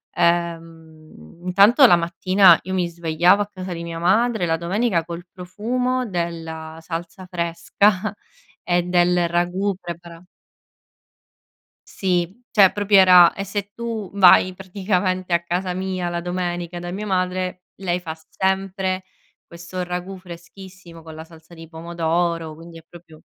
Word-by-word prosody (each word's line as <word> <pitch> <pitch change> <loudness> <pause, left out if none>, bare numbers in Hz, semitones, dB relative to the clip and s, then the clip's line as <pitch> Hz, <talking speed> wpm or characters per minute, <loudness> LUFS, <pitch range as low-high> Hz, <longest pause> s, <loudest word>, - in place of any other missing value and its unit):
uhm, 165 - -3
intanto 200 +9 +6
la 175 - +7
mattina 175 +2 +4
io 185 +1 -5
mi 180 -2 0
svegliavo 170 +3 +2
a - - -11
casa 185 -2 -8
di 170 - -6
mia 170 0 -6
madre, 215 +3 +2
la 165 -1 0
domenica 180 +1 0
col 170 +1 -8
profumo 250 +8 -2
della 165 -4 -5
salsa 170 +2 -7
fresca 185 +3 0 0.5
e 175 0 +1
del 175 0 +2
ragù 180 +4 0
prepara 170 -1 -9 1.7
Sì, 185 +4 -2
cioè 200 -4 +5
proprio 205 0 +2
era 180 -2 +7
e 195 - -4
se 200 +1 -5
tu 230 -4 -5
vai 185 -1 +6
praticamente 185 -1 -2
a 170 - +1
casa 180 +1 -2
mia, 185 -1 -3
la 170 0 -3
domenica, 175 -1 -4
da 175 0 -6
mia 205 +4 -5
madre, 185 -1 -2
lei 180 -2 -2
fa 160 -2 -7
sempre 190 0 -1 0.4
questo 175 +2 -7
ragù 180 +2 -5
freschissimo 180 -1 -13
con 160 0 -11
la 160 0 -9
salsa 165 0 -18
di 165 -1 -12
pomodoro, 165 0 -2
quindi 165 +1 -12
è 165 - -14
proprio 165 -2 -15
180 Hz, 140 wpm, -21 LUFS, 170-190 Hz, 1.7 s, la